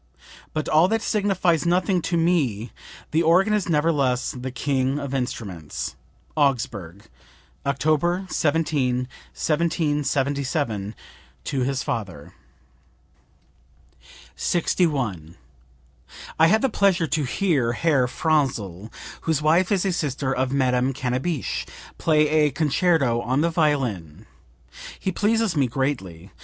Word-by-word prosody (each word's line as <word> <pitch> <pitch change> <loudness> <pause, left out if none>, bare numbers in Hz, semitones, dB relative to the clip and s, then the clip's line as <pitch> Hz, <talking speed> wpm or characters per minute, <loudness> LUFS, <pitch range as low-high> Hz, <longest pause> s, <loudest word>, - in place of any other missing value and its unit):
'But 155 -1 -3
all 160 +3 +5
that 225 +2 0
signifies 185 -6 +1
nothing; 180 +1 +1
to 170 +1 -1
me 145 - +1 0.4
the 160 - +2
organ 180 +6 +4
is 210 -4 0
nevertheless 150 -6 +1
the 130 0 -6
king 130 +1 -1
of 140 -2 -4
instruments.' 100 - -4 0.2
" - - -35
(Augsburg, 110 - -1 0.6
October 155 +6 +1
17, 145 -7 0 0.3
1777, 145 - -1 0.5
to 135 - -2
his 130 +1 -1
father.) 90 -10 -5 2.0
61. 125 - 0 1.0
"I 160 - +7
had 220 +7 +3
the - - +4
pleasure 195 -5 +2
to 155 -1 -1
hear 135 -4 +1
Herr 140 -3 +2
Franzl 120 - -1 0.4
(whose 155 -2 0
wife 170 +5 +3
is 200 -1 +2
a 190 - +1
sister 140 -5 -1
of 130 0 0
Madame 130 -1 +1
Cannabich) 130 +4 -2 0.3
play 155 -2 +3
a 150 0 +3
concerto 145 -3 +1
on 130 +4 0
the 170 +1 +1
violin. 115 - -1 0.7
He 190 - -2
pleases 215 0 +1
me 140 -3 +2
greatly. 100 - -3
145 Hz, 115 wpm, -23 LUFS, 125-165 Hz, 2.0 s, I